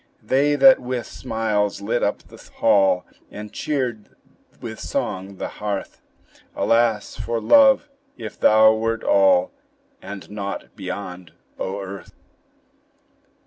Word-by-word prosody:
They 145 +3 +2
that 265 - +7
with 125 -1 -4
smiles 110 -4 -2
lit 110 +4 -1
up 100 - -1
the - - -16
hall, 95 -2 +3 0.2
And 105 0 -9
cheered 125 -8 -3 0.5
with - - -8
song 95 +1 -4
the - - -5
hearth; 105 -2 -4 0.5
Alas 115 -2 +1
for 115 -1 -2
love! 275 - +5 0.3
if 110 -3 -8
thou 110 0 +6
wert 115 +1 -2
all, 285 -2 +4 0.5
And 100 -1 -9
naught 100 -1 -6
beyond, 90 -3 -7 0.3
O 95 +2 -3
earth! 95 0 -9
110 Hz, 115 wpm, -22 LUFS, 100-125 Hz, 0.5 s, that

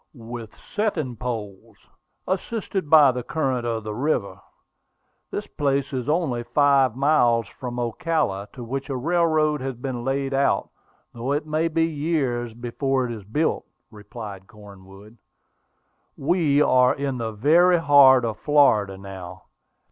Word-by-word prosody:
"With 115 -2 -9
setting 175 - -3
poles, 110 -2 -6 0.5
assisted 190 -3 -3
by 150 -4 +7
the 125 0 -4
current 130 -3 -2
of 115 -2 -2
the 105 0 -5
river. 105 - -2 0.9
This - - -4
place 140 -1 -1
is 125 0 -3
only 150 -7 0
five 135 -1 +3
miles 125 -5 +3
from 125 -1 -7
Ocala, 120 - -1
to 125 - -8
which 135 +4 -5
a 135 - -2
railroad 155 0 +1
has 135 -1 -4
been 125 0 -5
laid 135 +1 -2
out, 135 +1 +1 0.4
though 125 +3 -3
it 145 +1 -2
may 155 +2 0
be 165 0 +1
years 145 -7 -2
before 130 +2 -1
it 120 - -5
is 110 -3 -7
built," 150 +10 -1 0.3
replied 105 -2 -10
Cornwood. 100 +1 -15 1.0
"We 150 -2 +2
are 125 -2 +4
in 135 -3 -3
the 110 -1 -3
very 170 - +4
heart 140 -5 +6
of 110 -2 -4
Florida 110 -10 +3
now. 95 -2 -10
130 Hz, 140 wpm, -23 LUFS, 115-150 Hz, 1.0 s, by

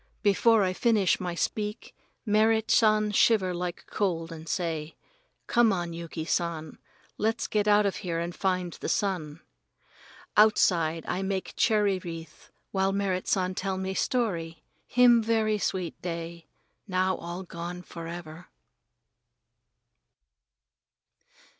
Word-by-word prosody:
Before 215 +2 +4
I 185 -1 0
finish 215 -2 +2
my 180 -2 -3
speak 210 +4 -3 0.3
Merrit 220 +1 +3
San 215 -1 +4
shiver 195 -3 +3
like 175 0 -4
cold 170 -5 -2
and 160 -1 -9
say, 165 -4 -2 0.5
"Come 235 -2 +4
on, 175 -3 -2
Yuki 165 -1 -6
San, 165 -3 -2 0.4
let's 225 +2 0
get 210 -1 0
out 210 0 +5
of 200 - 0
here 170 -3 -3
and 170 +1 -3
find 185 -3 -1
the - - -5
sun." 170 -6 -1 0.9
Outside 170 -6 +3
I 185 - -1
make 190 -1 -3
cherry 205 -4 +2
wreath 165 -3 -9 0.2
while 190 0 +1
Merrit 195 -2 -1
San 185 -1 +1
tell 190 0 -2
me 190 0 -3
story. 170 -9 -1 0.2
Him 245 -1 +5
very 220 -1 +1
sweet 185 -4 -3
day 170 -1 -6 0.4
now 185 -1 +1
all 175 +2 -6
gone 175 0 -7
forever. 170 -1 -8
185 Hz, 120 wpm, -28 LUFS, 170-210 Hz, 0.9 s, out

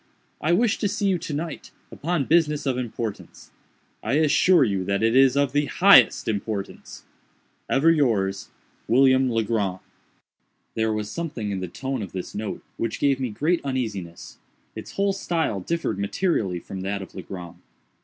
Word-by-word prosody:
I 155 - +1
wish 220 +5 +2
to 205 - +1
see 200 +1 -2
you 185 -3 +1
to 160 -2 -6
night, 160 +1 -5 0.2
upon 165 -2 -2
business 150 -2 +2
of 135 -2 0
importance. 115 -3 -6 0.5
I - - -2
assure 155 +3 +4
you 100 -6 0
that 100 +3 -1
it 115 +2 +3
is 135 0 +5
of 140 -2 +2
the 145 0 +2
highest 195 +2 +5
importance. 105 -2 -4 0.7
"Ever 150 +5 +4
yours, 105 -11 0 0.4
"WILLIAM 130 +1 +4
LEGRAND". 110 -5 0 1.0
There 110 0 0
was 105 -1 -3
something 140 -11 -4
in 95 - -2
the 90 - -4
tone 130 +7 -4
of 100 - -7
this 95 -1 -6
note 105 0 -5
which 115 - -3
gave 140 -2 +2
me 130 -2 -2
great 155 +11 0
uneasiness. 110 -11 -5 0.4
Its - - -8
whole 200 0 +1
style 165 - -1
differed 165 - -2
materially 100 - 0
from 95 +2 -8
that 100 +1 -3
of - - -13
Legrand. 90 -2 -8
125 Hz, 160 wpm, -24 LUFS, 100-155 Hz, 1.0 s, is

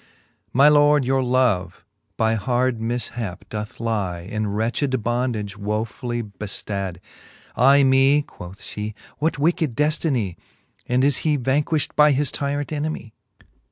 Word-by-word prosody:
My 140 +4 +5
lord, 145 -1 +5
your 135 +1 +2
love, 120 -9 0 0.3
by 110 0 +2
hard 120 +3 0
mifhap 115 -4 -4
doth 105 0 -6
lie 100 -7 -2
In 110 +4 -3
wretched 115 +4 -1
bondage, 120 -4 -1
wofully 110 +3 -3
beftad. 100 -3 -4 0.6
Ay 140 +2 +5
me, 135 +2 +4
quoth 90 -6 -11
Ihe, 105 0 -4 0.2
what 160 +2 0
wicked 155 -3 +1
deftinie? 145 - 0 0.5
And 125 +1 +2
is 140 -2 +4
he 150 -2 +1
vanquilht 145 +4 0
by 150 -1 +6
his 140 0 +1
tyrant 145 0 -2
enemie 150 -6 -4
125 Hz, 125 wpm, -22 LUFS, 105-140 Hz, 0.6 s, by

